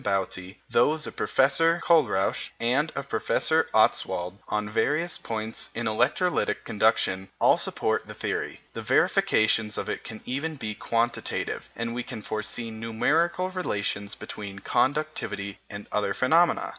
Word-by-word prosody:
Bouty, 95 -1 -2
those 150 +6 +2
of - - -7
Professor 165 +6 +3
Kohlrausch 155 - +2
and 130 +7 +1
of 140 0 -4
Professor - - +1
Ostwald 90 +3 +2
on 105 0 -1
various 155 +10 0
points 110 0 -4
in 120 - -2
electrolytic 145 +11 +1
conduction, 95 +1 +1
all - - +6
support - - 0
the - - -9
theory. - - -3
The - - -5
verifications 110 -1 +3
of - - -3
it - - -3
can 110 -1 -9
even 140 +5 -3
be 110 -6 -4
quantitative, 115 +2 -2
and 115 0 -3
we 125 - -2
can 110 -3 -7
foresee 110 +2 -3
numerical 165 +12 0
relations 105 - -2
between 100 -4 -7
conductivity 130 -5 -1
and 100 0 -7
other 100 -2 0
phenomena. 165 +7 +3
115 Hz, 135 wpm, -26 LUFS, 105-150 Hz, -, all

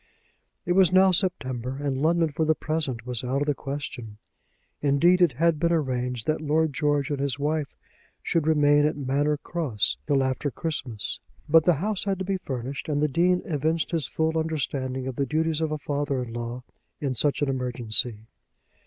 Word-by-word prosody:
It 175 - -1
was 185 -2 +5
now 190 +1 +6
September, 130 - -1
and 140 -2 -1
London 165 +4 +2
for 160 - -1
the 155 0 +3
present 150 -8 -3
was 125 -2 -2
out 135 +3 0
of - - -3
the 145 - +1
question. 135 -6 -6 0.6
Indeed, 165 +6 +4
it 170 -7 +5
had 165 +3 +2
been 170 +1 +2
arranged 125 -7 -1
that 155 0 0
Lord 155 0 +1
George 145 0 0
and 145 - -1
his 140 -1 -1
wife 150 0 -2 0.5
should 160 -2 0
remain 145 -2 +4
at 155 - -2
Manor 145 +2 0
Cross 145 -10 -1
till 140 -2 +3
after 130 +2 -1
Christmas. 130 - -3 0.3
But 160 +1 +5
the 175 - +5
house 200 +6 -2
had 195 -1 0
to 190 - -4
be 195 0 0
furnished, 135 -4 -5
and 145 -1 0
the 150 - +3
Dean 175 +5 +2
evinced 160 -2 -1
his 160 -7 0
full 160 +5 0
understanding 135 -5 -2
of 130 -2 -5
the 140 - 0
duties 160 0 0
of 160 -1 0
a 155 - -1
father 145 -2 -2
in 115 -2 -8
law 120 +1 -5 0.4
in 140 -3 -1
such 145 +4 0
an - - +1
emergency. 120 -3 0
145 Hz, 190 wpm, -26 LUFS, 130-160 Hz, 0.6 s, now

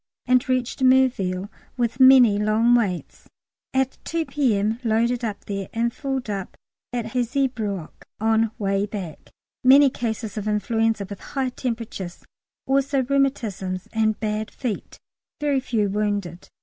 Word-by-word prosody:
and 255 +2 +2
reached 255 0 -1
Merville 245 -8 +3 0.3
(with 240 +1 -1
many 255 -6 +7
long 215 +3 +3
waits) 200 -8 -1 0.4
at 265 0 0
2 330 -1 -2
P.M. 225 -7 +1
Loaded 235 +2 +1
up 210 -3 -4
there, 195 -2 -4
and 235 +1 0
filled 270 -3 -3
up 200 -3 -5 0.3
at 240 -2 -2
Hazebrouck 240 - -2
on 225 +1 +2
way 195 0 0
back. 190 -7 -7 0.3
Many 270 +2 +7
cases 220 -3 -3
of 210 - -5
influenza 225 0 0
with 200 -1 -8
high 265 -2 -2
temperatures, 230 -8 -5 0.4
also 275 0 +1
rheumatisms 235 -9 -1
and 220 -1 +1
bad 215 0 -2
feet, 240 -7 -5 0.4
very 290 -2 +1
few 230 -5 0
wounded. 200 -5 -2
225 Hz, 130 wpm, -23 LUFS, 205-255 Hz, 0.4 s, many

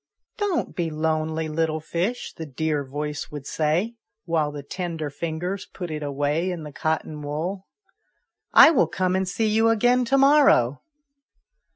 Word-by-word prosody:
" - - -52
Don't 405 -5 -1
be 170 -2 -1
lonely, 160 0 -1
little 155 0 -1
fish," 175 +9 -3
the 160 - -7
dear 150 +1 -1
voice 145 +2 -5
would 145 -2 -8
say, 170 +12 0 0.3
while 160 -3 0
the 145 -1 -7
tender 165 -2 -4
fingers 170 +6 -4
put 180 -3 -7
it 155 -1 -4
away 145 +4 -1
in 175 -3 -4
the 150 - -8
cotton 155 -1 -2
wool. 165 +7 -4 0.8
"I - - +9
will 295 - +3
come 185 0 0
and 190 -1 0
see 220 +4 -1
you 220 +1 +3
again 245 +3 +3
to 270 +4 +2
morrow." 275 - +5
160 Hz, 160 wpm, -24 LUFS, 150-190 Hz, 0.8 s, I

